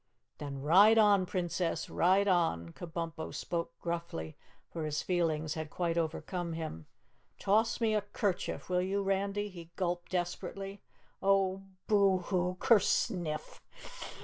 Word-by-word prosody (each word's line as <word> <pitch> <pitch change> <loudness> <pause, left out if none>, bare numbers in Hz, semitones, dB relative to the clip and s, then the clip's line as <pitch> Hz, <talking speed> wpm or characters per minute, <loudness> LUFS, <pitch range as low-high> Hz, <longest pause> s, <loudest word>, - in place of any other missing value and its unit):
"Then 140 -2 -5
ride 200 +9 +7
on, 205 -4 +5
Princess! 175 -2 -1
Ride 190 +3 +3
on!" 165 - +2
Kabumpo 165 -1 -5
spoke 170 -7 -4
gruffly, 170 - -4 0.4
for 165 - -4
his 150 -1 -2
feelings 160 -4 0
had 155 -1 -5
quite 170 0 -1
overcome 170 +1 -2
him. 155 - -6 0.5
"Toss 220 +5 +2
me 225 -2 +2
a 210 - +2
'kerchief, 200 -2 -2
will 180 0 +1
you, 195 +2 0
Randy?" 200 +1 0
he 170 -3 -11
gulped 175 -2 -2
desperately. 190 +2 -3 0.4
"Oh, 195 -1 +2 0.2
boo 200 -3 +4
hoo, 180 0 -1
kerSNIFF! 175 -7 +1
180 Hz, 125 wpm, -32 LUFS, 165-195 Hz, 0.5 s, ride